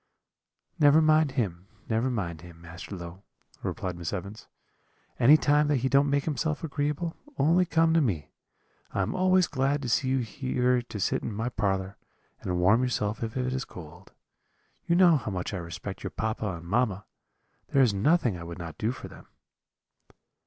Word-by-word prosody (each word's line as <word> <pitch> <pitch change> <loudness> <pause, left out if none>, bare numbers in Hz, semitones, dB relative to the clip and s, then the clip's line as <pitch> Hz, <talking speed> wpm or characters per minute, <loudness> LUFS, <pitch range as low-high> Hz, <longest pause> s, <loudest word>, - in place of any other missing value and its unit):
"'Never 145 0 +6
mind 155 -2 +3
him, 95 -8 -2 0.2
never 115 +3 0
mind 85 -10 -3
him, 85 -1 -13
Master 85 +4 -9
Low,' 85 +1 -9 0.4
replied 90 -2 -3
Miss 85 -1 -5
Evans; 100 +2 -6 0.7
'any 140 +6 +7
time 150 0 +3
that 145 - +2
he - - +2
don't 140 +1 +4
make 140 0 +1
himself 150 +1 -2
agreeable, 150 +2 -2 0.2
only 170 +5 +3
come 165 0 +3
to 165 - +4
me; 90 - -2 0.6
I - - 0
am - - -2
always 185 0 +4
glad 140 0 0
to 125 - -3
see 130 +3 +1
you 130 +1 +2
here 125 +1 0
to 115 -3 -8
sit 90 - 0
in - - -4
my 110 +4 -2
parlour, 95 -4 -2 0.4
and 90 -1 -2
warm 95 +7 +4
yourself 110 -4 -1
if 115 +3 -4
it 125 0 -1
is 130 -1 -2
cold. 90 +2 -12 0.8
You 170 - +3
know 175 -3 +6
how 115 - -5
much 95 0 -4
I - - -2
respect 85 +3 -7
your - - -4
papa 110 0 -3
and 85 0 -10
mamma; 100 0 0 0.6
there 135 - +4
is 115 -5 +3
nothing 120 - +2
I - - -7
would 85 0 -7
not 85 -2 -8
do 110 +2 0
for 130 - -8
them.' - - -14
120 Hz, 180 wpm, -27 LUFS, 95-145 Hz, 0.8 s, any